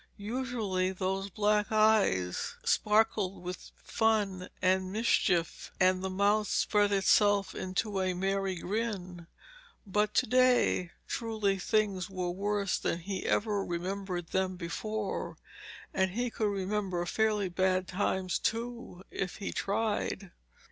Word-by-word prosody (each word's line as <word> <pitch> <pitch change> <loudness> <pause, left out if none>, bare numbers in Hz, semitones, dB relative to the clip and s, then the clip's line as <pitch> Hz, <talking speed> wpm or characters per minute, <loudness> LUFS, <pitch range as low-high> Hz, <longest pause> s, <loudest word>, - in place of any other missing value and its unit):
Usually 210 -4 -1
those 190 +1 -2
black 210 +1 +1
eyes 215 - +2
sparkled 210 -3 +2
with 180 +1 -6
fun 205 -5 0
and 185 0 +2
mischief, 190 -6 +1
and 185 0 +3
the 190 - -1
mouth 205 +2 +2
spread 205 -1 +2
itself 200 0 +3
into 190 +2 -2
a 185 -1 0
merry 195 +1 0
grin. 185 -3 -4 0.6
But 210 +1 0
to - - +4
day, 250 -7 +3 0.2
truly 215 -4 -1
things 195 -2 0
were 180 -2 -2
worse 200 +1 -1
than 170 - -1
he 190 +2 -4
ever 205 -2 +1
remembered 180 0 -4
them 190 0 0
before, 205 +4 -4 0.6
and 190 -1 +2
he 240 +5 -2
could 215 - 0
remember 195 -2 -1
fairly 210 0 +1
bad 185 0 +1
times, 185 -1 -1
too, 230 -5 -3
if 190 -2 -3
he 200 - -4
tried. 205 -2 -1
195 Hz, 120 wpm, -30 LUFS, 185-215 Hz, 0.6 s, to